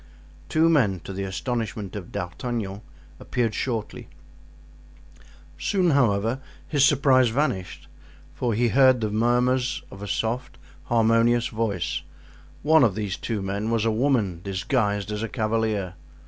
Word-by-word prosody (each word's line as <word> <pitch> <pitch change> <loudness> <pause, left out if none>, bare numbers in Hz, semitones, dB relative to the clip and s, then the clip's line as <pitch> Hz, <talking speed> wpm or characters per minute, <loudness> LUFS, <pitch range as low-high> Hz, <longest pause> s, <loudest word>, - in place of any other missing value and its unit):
Two 160 +1 +3
men, 120 - +3
to 95 - -8
the 95 - -4
astonishment 110 0 -4
of 95 -4 -7
D'Artagnan, 100 +2 -4 0.4
appeared 120 -4 -1
shortly; 115 -4 -4 1.5
soon, 185 -4 +2
however, 115 -3 +2 0.3
his 145 -3 +2
surprise 135 -3 +4
vanished, 115 -8 -2 0.5
for 120 -3 -1
he 120 +2 +2
heard 130 0 +5
the 110 -1 -1
murmurs 125 +4 +1
of 95 - -11
a 105 - -5
soft, 120 +4 -2 0.3
harmonious 115 -1 +3
voice; 105 -6 -2 0.6
one 155 -1 +5
of 110 -6 +3
these 105 -3 -2
two 110 -4 -3
men 100 +3 -2
was 115 -1 +1
a 115 - +2
woman 110 -8 +1
disguised 100 +1 -1
as 105 0 -3
a 115 - -3
cavalier. 110 -5 -1
115 Hz, 135 wpm, -25 LUFS, 100-125 Hz, 1.5 s, heard